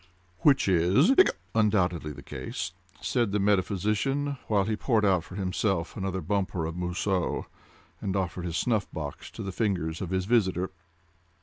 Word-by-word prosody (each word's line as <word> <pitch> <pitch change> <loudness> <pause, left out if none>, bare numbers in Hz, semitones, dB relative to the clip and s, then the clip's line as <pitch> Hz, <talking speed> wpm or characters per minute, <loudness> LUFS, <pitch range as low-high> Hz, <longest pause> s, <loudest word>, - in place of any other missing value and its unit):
"Which 140 -7 +4
is—hiccup!—undoubtedly 95 - +3
the 70 -1 -10
case," 75 +5 -5 0.3
said 120 -5 +1
the 105 - +1
metaphysician, 105 +8 +1
while 105 -3 +3
he 110 +2 -1
poured 110 -1 +2
out 95 -4 +3
for 90 - -11
himself 95 -2 -1
another 95 -1 -2
bumper 95 -1 -1
of 80 +1 -4
Mousseux, 90 +1 -1 0.6
and 95 -1 -2
offered 90 -2 -2
his 85 -1 -2
snuff 110 -5 0
box 75 -3 -6
to - - -7
the 95 - -4
fingers 90 -6 -1
of 95 - -3
his 95 0 0
visitor. 95 -5 +2
95 Hz, 145 wpm, -28 LUFS, 90-105 Hz, 0.6 s, Which